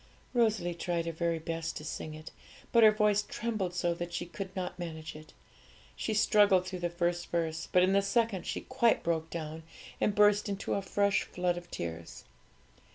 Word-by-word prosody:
Rosalie 220 -7 +2
tried 170 -1 -2
her 165 - -2
very 170 0 -1
best 165 0 -4
to 150 - -8
sing 155 0 -5
it, 155 +1 -10 0.4
but 235 - +5
her 220 - +9
voice 210 -1 +3
trembled 210 -5 -3
so 175 -1 +1
that 175 0 -5
she 175 0 -3
could 190 +2 -7
not 180 -1 -4
manage 160 -3 -6
it. 155 0 -12 0.6
She 220 - -2
struggled 205 -3 +5
through 185 -1 -5
the 175 0 -1
first 175 0 -1
verse, 165 -1 -2
but 180 - +5
in 185 +1 +3
the 200 - +4
second 220 -1 0
she - - -2
quite 245 -3 +2
broke 165 -1 -1
down, 160 -1 -5 0.4
and 205 - +2
burst 210 0 +4
into 200 -1 -2
a 200 - 0
fresh 200 +1 +1
flood 180 -1 -1
of 175 0 -8
tears. 85 0 -6
175 Hz, 190 wpm, -31 LUFS, 165-205 Hz, 0.6 s, her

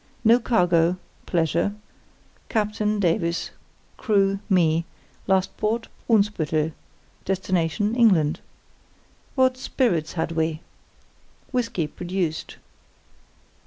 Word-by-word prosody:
No 230 +1 +6
cargo 180 -6 +2 0.3
(pleasure); 170 +4 +1 0.7
captain, 210 -1 0
Davies; 170 -2 0 0.5
crew, 195 -3 +2
me; 165 -4 +3 0.4
last 190 -1 +1
port, 225 +2 -1 0.2
Brunsbüttel; 165 -8 +2 0.5
destination, 190 +2 0
England. 190 -11 +3 1.0
What 260 -1 +3
spirits 180 - 0
had 165 -1 -2
we? 160 -1 -1 0.9
Whisky, 230 -9 0
produced. 175 0 -3
185 Hz, 80 wpm, -24 LUFS, 165-215 Hz, 1.0 s, No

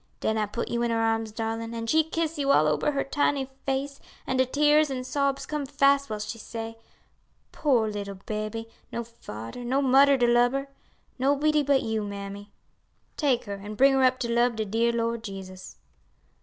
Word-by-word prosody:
Den 220 - 0
I 215 -1 0
put 235 +3 -4
you 235 - -1
in 240 - +1
her 230 - +1
arms, 225 -1 0
darlin', 225 +1 -4
an' 230 0 -4
she 315 +7 +3
kiss 320 0 -3
you 280 -1 +2
all 155 - +5
ober 150 - +1
your 275 - 0
tiny 275 -1 0 0.2
face, 275 +1 -2 0.3
an' 260 - -1
de 260 0 +3
tears 300 +2 +4
an' 255 -2 -3
sobs 275 +1 -1
come 300 -1 -3
fast 280 0 +3
while 215 - -3
she 215 +2 -6
say, 225 +1 -6 0.7
'Poor 250 -7 +2
little 200 -2 -5
baby; 215 +3 -5 0.2
no 235 - -3
fader 225 - -9
no 255 +3 +1
mudder 275 +1 +5
to 245 - +3
lub 240 +1 +4
her! 275 0 -3 0.5
nobody 290 +3 +3
but 280 -1 +2
you, 220 -1 -1
mammy; 200 0 -7 0.6
take 270 -6 +1
her 200 -1 -5
an' 205 +2 -8
bring 270 +5 +5
her 270 - +3
up 255 0 +4
to 240 - -2
lub 240 0 +2
de 220 0 -2
dear 225 +3 +1
Lord 230 -1 -1
Jesus.'" 190 -3 -9
235 Hz, 195 wpm, -26 LUFS, 220-275 Hz, 0.7 s, all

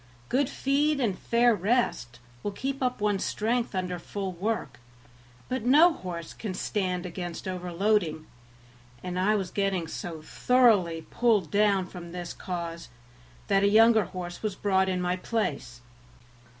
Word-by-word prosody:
Good 265 +1 +1
feed 285 +2 +1
and 220 -8 +1
fair 235 +4 +3
rest 200 - 0 0.2
will 205 - -3
keep 270 +4 -4
up 250 -1 0
one's 205 -2 +1
strength 230 0 -1
under 180 -1 -2
full 195 +2 -4
work, 175 - -3 0.7
but 255 -1 -2
no 305 +8 +6
horse 170 - -7
can 205 -5 -5
stand 185 -3 -2
against 175 0 -6
overloading; 180 -2 0 0.8
and 180 0 -3
I 210 +3 +3
was 190 -4 -2
getting 195 -4 0
so 160 -1 -6
thoroughly 200 -8 +3
pulled 215 -9 +2
down 200 -2 +3
from 175 -2 -10
this 175 -1 -5
cause 170 -2 -5 0.6
that 195 -1 +2
a 200 - +4
younger 220 0 +6
horse 175 -1 -7
was 215 -3 -2
bought 190 -1 +1
in 180 -1 -1
my 180 0 0
place. 140 - -3
190 Hz, 145 wpm, -27 LUFS, 175-225 Hz, 0.8 s, no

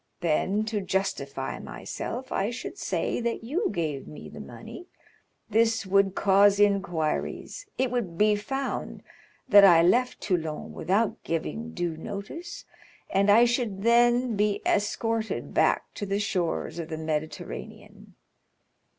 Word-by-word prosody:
Then, 185 +6 +1
to 215 -2 -2
justify 180 -9 -2
myself, 260 +2 -6
I 200 - 0
should 240 - -6
say - - -1
that 235 -1 -2
you 350 - -1
gave 150 -5 -3
me 150 - -10
the - - -10
money; 360 - -10 0.6
this 225 0 +2
would 195 0 +3
cause 200 +1 +4
inquiries, 195 - 0
it 260 -1 +1
would 205 -9 -2
be 210 +1 +4
found 270 +6 -4 0.4
that 205 -1 +8
I 170 -4 +8
left 245 +8 +2
Toulon 160 -6 -2
without 205 +4 0
giving 225 +8 -3
due 175 -3 -2
notice, 200 - -7 0.5
and 195 +1 +3
I 225 +4 +7
should 235 -5 -1
then 240 +1 +4
be 205 0 0
escorted 220 +2 -1
back - - +2
to 205 - -5
the 200 +1 0
shores 180 -4 -2
of 165 -1 -5
the 160 - -4
Mediterranean. 155 0 -6
205 Hz, 135 wpm, -27 LUFS, 175-230 Hz, 0.6 s, that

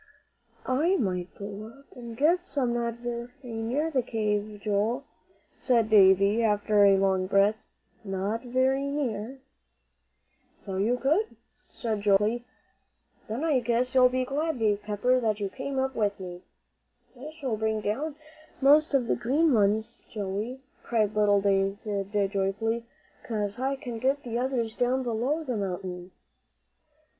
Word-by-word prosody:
"I 310 +9 +2
might 180 - -2
go 200 +1 -7
up 275 - -21
and 235 -2 -9
get 345 +6 +2
some 260 -4 0
not 235 -1 -1
very 240 0 -5
near 245 +7 -2
the 265 -4 +2
cave, 210 -2 -2
Joel," 215 +6 0 0.6
said 230 -4 +2
Davie, 200 +1 +6
after 210 -1 +3
a 195 -1 +6
long 190 -1 +1
breath. 200 +2 +3 0.5
"Not 200 +3 -2
very 260 +2 +1
near." 265 -3 -3 1.2
"So 190 -1 -4
you 225 +6 +1
could," 320 - +1 0.4
said 220 -3 -3
Joel, 200 -1 +5
quickly. 225 +4 -1 0.8
"Then 230 +7 -3
I 305 -5 +3
guess 245 +1 0
you'll 255 -1 +6
be 255 0 -1
glad, 295 +3 -1
Dave 210 -3 +1
Pepper, 215 +5 +1
that 220 -3 0
you 200 -1 -2
came 270 +5 -5
up 265 0 0
with 205 -4 -1
me." 180 -1 -8 0.7
"I 265 +5 -8
shall 285 -7 -3
bring 220 0 -1
down 280 +9 -2 0.4
most 295 +2 +5
of 255 -3 +2
the - - +1
green 290 +5 +2
ones, 215 +1 +1
Joey," 210 +5 -4 0.2
cried 215 -3 0
little 205 -1 +4
David, 200 0 0
joyfully, 225 +4 -1 0.4
"'cause 210 -1 -3
I 270 +1 0
can 245 -5 -6
get 270 +3 0
the 235 -1 -3
others 245 -3 -1
down 255 +2 +1
below 250 +7 -1
the 250 -6 -3
mountain." 180 -2 -4
230 Hz, 145 wpm, -27 LUFS, 205-260 Hz, 1.2 s, Davie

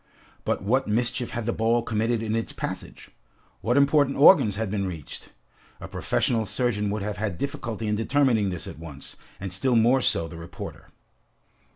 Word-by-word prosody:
But - - -1
what 125 +6 +1
mischief 120 +3 0
had 120 -1 -4
the 120 - 0
ball 115 +1 +1
committed 115 +1 0
in 110 0 -1
its 115 - -2
passage? - - -6 0.5
What 120 +4 +1
important 140 0 +3
organs 140 - +7
had 110 -2 -2
been 100 -2 -1
reached? 80 -6 -7 0.5
A - - -7
professional 115 -3 0
surgeon 105 -3 0
would 105 0 -2
have 105 0 -3
had 105 -4 -2
difficulty 120 - -4
in 105 - 0
determining 115 -3 +2
this 90 -2 -4
at - - -8
once, 75 -4 -9 0.2
and 95 -1 -4
still 125 +7 +2
more 120 +4 +4
so 85 -8 +1
the 85 - -10
reporter. 85 +1 -9
110 Hz, 175 wpm, -25 LUFS, 100-120 Hz, 0.5 s, organs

